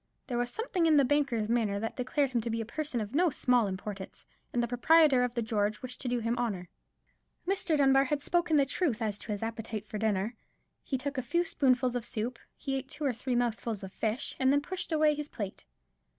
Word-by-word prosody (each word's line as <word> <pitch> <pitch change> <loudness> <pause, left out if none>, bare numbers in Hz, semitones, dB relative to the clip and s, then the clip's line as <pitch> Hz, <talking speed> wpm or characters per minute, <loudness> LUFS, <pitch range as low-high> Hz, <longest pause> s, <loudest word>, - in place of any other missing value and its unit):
There 240 -2 -2
was 245 0 0
something 370 - 0
in 310 -2 +5
the 280 - +5
banker's 260 -6 +1
manner 220 -4 +1
that 225 +2 -3
declared 265 +2 0
him 240 -2 +1
to 235 - -4
be 225 0 -1
a 225 - -2
person 285 +2 -3
of 215 +1 -4
no 345 +4 +4
small 250 -5 +2
importance; 195 0 -6 0.3
and 240 - +1
the - - 0
proprietor 275 +2 +5
of 250 -1 0
the 235 - 0
George 210 0 -1
wished 250 -1 -6
to 260 - -3
do 245 0 +1
him 230 0 0
honour. 195 -7 -2 0.8
Mr. 365 -5 +1
Dunbar 270 -1 +5
had 290 +2 0
spoken 345 +1 +2
the 280 - +5
truth 275 -4 0
as 210 -3 -2
to 220 - -6
his 205 +1 -3
appetite 225 -1 -4
for 215 0 -5
his - - -6
dinner. 215 0 0 0.5
He 265 - -1
took 280 +1 -3
a - - 0
few 340 +8 0
spoonfuls 255 -5 +2
of 245 - -1
soup, 235 +2 -4 0.2
he 270 - -3
ate 270 0 -3
two 295 +1 -4
or 265 - +2
three 245 +2 -2
mouthfuls 230 -3 -1
of 190 0 -8
fish, 225 +4 -2
and 260 0 +4
then 285 +1 +3
pushed 370 +4 -5
away 305 -1 +4
his 295 0 -4
plate. 200 -4 -6
245 Hz, 235 wpm, -30 LUFS, 220-285 Hz, 0.8 s, in